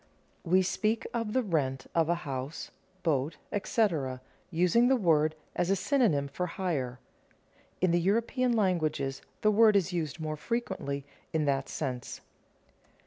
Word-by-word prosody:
_ - - -33 0.5
We 185 +1 +6
speak 215 +4 0
of 230 -3 -2
the 260 - +2
rent 135 - -1
of 165 -1 +2
a 175 - +3
house, 135 +2 -5 0.3
boat, 150 -2 0
etc., 165 - 0 0.3
using 180 +7 +3
the 265 - +5
word 155 -8 +3 0.2
as 175 - 0
a 195 - +4
synonym 195 - +2
for 180 +6 -3
hire. 150 -9 -2 0.8
In 185 -1 +3
the 175 0 +3
European 235 +6 +1
languages 155 -10 0 0.2
the 215 - +4
word 215 0 +6
is 190 -2 +2
used 165 -2 -2
more 155 -1 -3
frequently 170 - -3 0.3
in 155 -2 +1
that 135 -1 0
sense. 130 -5 -4
170 Hz, 145 wpm, -30 LUFS, 140-210 Hz, 0.8 s, We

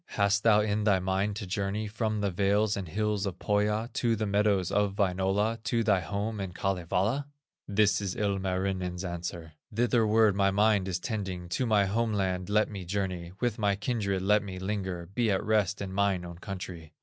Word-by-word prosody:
Hast 100 0 +3
thou 105 -1 +5
in 105 0 0
thy 105 -2 +4
mind 95 +2 0
to 100 - -5
journey 100 +3 -2
From 110 0 -2
the 100 -1 0
vales 100 +3 +2
and 95 -3 -4
hills 105 +3 -1
of 95 -2 -5
Pohya, 105 +2 0
To 115 -2 +1
the 110 0 -2
meadows 100 -2 +2
of 105 -1 +1
Wainola, 100 +3 +1
To 115 0 +1
thy 105 -4 +3
home 100 +4 -3
in 95 -2 -4
Kalevala?" 95 +8 -1 0.4
This 100 -1 +3
is 95 -3 -3
Ilmarinen's 95 -3 -1
answer: 85 -2 -5 0.2
"Thitherward 110 -2 +3
my 100 0 +3
mind 100 -1 +3
is 90 -2 -1
tending, 95 -5 -4
To 125 +8 -1
my 105 -3 +4
home 110 +3 0
land 95 -2 -1
let 105 +1 +3
me 100 -3 -7
journey, 90 -2 -3
With 120 -3 0
my 100 -2 +2
kindred 100 -3 -1
let 105 +2 +4
me 95 -2 -7
linger, 95 -2 -3
Be 110 +6 -1
at 95 -2 +1
rest 105 -2 +1
in 95 -1 -6
mine 95 -2 +1
own 85 -1 -9
country." 90 -5 -7
100 Hz, 185 wpm, -29 LUFS, 95-105 Hz, 0.4 s, thou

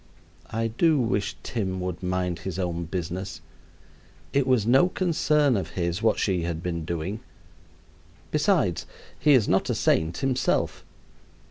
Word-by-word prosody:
I 115 +1 -1
do 150 +7 +2
wish 115 -3 0
Tim 95 -5 -2
would 90 -1 -4
mind 90 -1 -1
his 95 -1 -5
own 85 -2 -2
business. 90 +2 -4 0.9
It 140 -1 +2
was 125 -5 +3
no 135 +10 +5
concern 150 -7 +2
of 95 - -2
his 85 +2 -1
what 110 -1 +3
she 95 -4 +1
had 85 0 -3
been 85 -3 -3
doing. 85 +6 -3 1.1
Besides, 150 - +1 0.3
he 150 - +5
is 120 -6 +4
not 95 - +2
a - - +1
saint 80 +1 +1
himself. 135 -2 0
95 Hz, 140 wpm, -26 LUFS, 90-130 Hz, 1.1 s, no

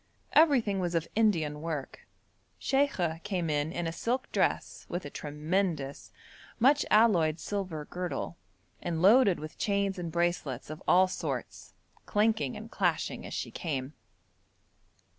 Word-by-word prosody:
Everything 250 -11 +4
was 175 -2 -1
of 165 -1 0
Indian 165 -10 +2
work. 155 -4 -5 0.5
Sheikha 185 - 0
came 180 -6 -1
in 150 +1 0
in 175 0 -3
a 165 - -1
silk 245 +9 -2
dress - - 0
with 175 -1 -3
a 145 - -7
tremendous, 150 -1 -2 0.5
much 275 +5 +4
alloyed 175 -8 +4
silver 185 -7 -4
girdle, 180 0 -4 0.5
and 170 -2 -2
loaded 205 -2 +6
with 155 +1 -9
chains 200 -2 0
and 170 -2 -4
bracelets 170 -6 -1
of 155 - -8
all 185 +1 +6
sorts, 185 - -5 0.3
clanking 210 - +1
and - - -9
clashing - - -1
as - - -8
she - - -4
came. 140 -3 -3
175 Hz, 135 wpm, -30 LUFS, 155-205 Hz, 0.5 s, loaded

